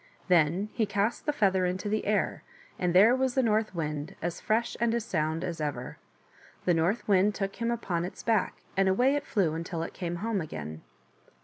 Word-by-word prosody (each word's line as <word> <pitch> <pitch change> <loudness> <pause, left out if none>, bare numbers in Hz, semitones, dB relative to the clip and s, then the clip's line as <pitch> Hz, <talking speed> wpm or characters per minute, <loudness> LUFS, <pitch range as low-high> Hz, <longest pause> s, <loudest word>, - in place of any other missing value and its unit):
Then 175 +4 +3
he 220 -3 0
cast 205 +8 -1
the - - +4
feather 195 -9 +2
into 185 +3 -3
the 215 0 -1
air, 210 -1 0 0.4
and 180 -1 0
there 215 +7 +7
was 260 -1 0
the 265 - +3
North 215 -3 +1
Wind, 150 -2 -3
as 175 0 -4
fresh 230 +2 0
and 235 -1 +2
as 235 -2 -2
sound 160 -5 -1
as 170 -3 -4
ever. 140 -5 -4 0.7
The 180 - +4
North 170 +8 0
Wind 200 0 +4
took 195 0 -3
him 230 0 -1
upon 190 -8 -1
its 180 - -7
back, 220 -4 +1 0.2
and 195 0 +3
away 250 +8 +3
it 290 0 -2
flew 185 -8 +1
until 165 0 -3
it - - -6
came 175 -1 -4
home 205 +2 -1
again. 80 - -6
190 Hz, 200 wpm, -29 LUFS, 170-220 Hz, 0.7 s, there